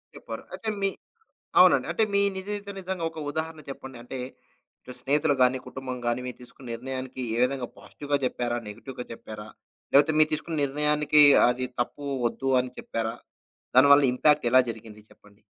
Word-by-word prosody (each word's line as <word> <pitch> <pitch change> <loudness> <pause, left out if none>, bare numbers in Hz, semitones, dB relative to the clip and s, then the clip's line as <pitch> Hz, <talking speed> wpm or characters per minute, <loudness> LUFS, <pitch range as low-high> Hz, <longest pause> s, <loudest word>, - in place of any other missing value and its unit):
చెప్పరు. - - -8
అయితే 225 - -4
మీ 195 - +2 0.7
అవునండి. - - +6
అంటే, 220 - +1
మీ 200 - +4 0.2
నిజ 190 - -6
జీవితంలో 200 -1 -6
జరిగిన 185 -3 -2
ఒక 160 - -9
ఉదాహరణ 160 +1 -4
చెప్పండి. 135 -1 -8
అంటే, 130 +2 -7 0.6
ఇటు 125 - -10
స్నేహితులు 145 +1 +2
గాని, 125 +1 +4
కుటుంబం 130 -1 -6
గాని, 120 +1 +1
మీరు 125 - -7
తీసుకున్న 125 +1 -14
నిర్ణయానికి 130 +1 -6
ఏ - - -2
విధంగా 130 -1 -1
పాజిటివ్‌గా 145 -1 -3
చెప్పారా? 120 -1 -1
నెగెటివ్‌గా 125 +4 -8
చెప్పారా? 110 -2 -9 0.5
లేపోతే, 145 +3 +5
మీరు 155 0 +5
తీసుకున్న 160 +1 -3
నిర్ణయానికి 150 +1 +3 0.3
అది 125 +1 -1
తప్పు 145 +4 -3 0.2
ఒద్దు 135 +2 -3
అని 125 0 -7
చెప్పారా? 115 0 -3 0.6
దానివల్ల 140 +2 +7
ఇంపాక్ట్ 145 +1 +3
ఎలా 130 - +7
జరిగింది 110 -1 -9
చెప్పండి? 105 0 -22
135 Hz, 160 wpm, -26 LUFS, 125-150 Hz, 0.7 s, దానివల్ల